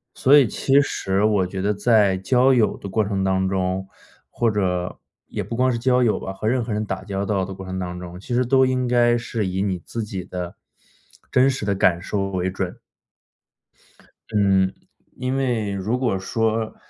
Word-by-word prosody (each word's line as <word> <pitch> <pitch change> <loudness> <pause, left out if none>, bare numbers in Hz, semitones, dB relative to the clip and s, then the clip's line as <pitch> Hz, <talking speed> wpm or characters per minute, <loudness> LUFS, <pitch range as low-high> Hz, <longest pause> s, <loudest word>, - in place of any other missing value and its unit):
所 140 +3 +6
以 140 -4 +5
其 135 +6 +2
实 95 -7 -1
我 105 -3 +3
觉 95 +1 -6
得 105 +2 +1
在 105 -2 +3
交 125 +7 +3
友 115 -4 +2
的 - - -8
过 105 +3 +1
程 100 -1 -1
当 95 0 +1
中， 95 0 -1 0.4
或 115 -2 0
者 90 -3 -1 0.3
也 - - -4
不 115 - -5
光 130 +2 +2
是 120 - -2
交 125 +1 +3
友 110 -3 +2
吧， 95 - -5
和 100 +3 -4
任 125 +1 +1
何 115 - -5
人 105 +1 -1
打 95 -2 -4
交 100 0 -3
道 100 -1 0
的 95 +1 -6
过 95 0 -9
程 95 0 -4
当 90 -1 -5
中， 90 0 -9
其 120 +5 -4
实 125 +1 +2
都 130 +2 +4
应 130 -1 0
该 120 -1 +3
是 115 -3 -3
以 95 +1 -1
你 95 -3 -1
自 115 +6 -5
己 100 -4 -5
的 90 -1 -6 0.8
真 130 +1 +4
实 130 -5 -3
的 100 - +1
感 95 -3 +2
受 100 +2 -2
为 95 -1 -1
准。 95 -1 -4 1.6
嗯， 95 -2 +3 0.5
因 130 +1 -2
为 120 -6 0
如 100 +5 -1
果 120 -7 0
说， 110 +2 -1
100 Hz, 215 characters per minute, -22 LUFS, 95-120 Hz, 1.6 s, 所